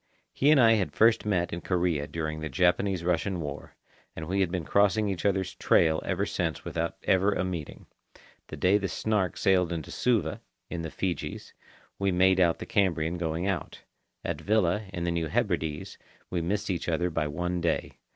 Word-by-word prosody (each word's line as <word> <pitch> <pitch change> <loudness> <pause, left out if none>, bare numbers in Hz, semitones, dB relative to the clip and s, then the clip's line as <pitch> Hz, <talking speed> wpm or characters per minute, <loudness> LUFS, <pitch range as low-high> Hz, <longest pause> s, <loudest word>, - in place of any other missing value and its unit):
He 140 - +2
and 155 -2 +6
I 115 -3 +7
had 105 -5 +1
first 115 -1 +4
met 90 -5 0
in 85 - -4
Korea 85 -5 0
during 80 -1 -4
the 80 0 -4
Japanese 90 +4 +1
Russian 90 +2 0
War, 75 -2 -6 0.4
and 80 - -6
we 95 +3 0
had 95 -3 +2
been 90 -3 -3
crossing 105 +3 +3
each 95 0 -1
other's 95 -2 0
trail 80 -3 +3
ever - - -1
since - - -2
without 85 0 -3
ever 95 +2 +3
a - - -1
meeting. 85 -5 -5 0.6
The - - -8
day 95 +3 +3
the 100 - -2
Snark 100 +1 -1
sailed 90 -2 +2
into 80 -4 -4
Suva, 110 -11 0 0.3
in 85 - -3
the 80 - -4
Fijis, 90 +1 -4 0.5
we 100 -1 +1
made 95 +1 +4
out 85 -2 +3
the - - -7
Cambrian 85 -4 0
going 85 +1 -2
out. 95 -5 -3 0.4
At - - -3
Vila, 105 -1 +1
in 85 -3 -4
the 85 - 0
New 85 -1 -1
Hebrides, 85 -6 -2 0.3
we 90 - 0
missed 100 +4 -1
each 90 -1 -2
other 85 +2 0
by 75 -2 -1
one 90 +4 -2
day. 85 - -1
90 Hz, 190 wpm, -28 LUFS, 85-100 Hz, 0.6 s, I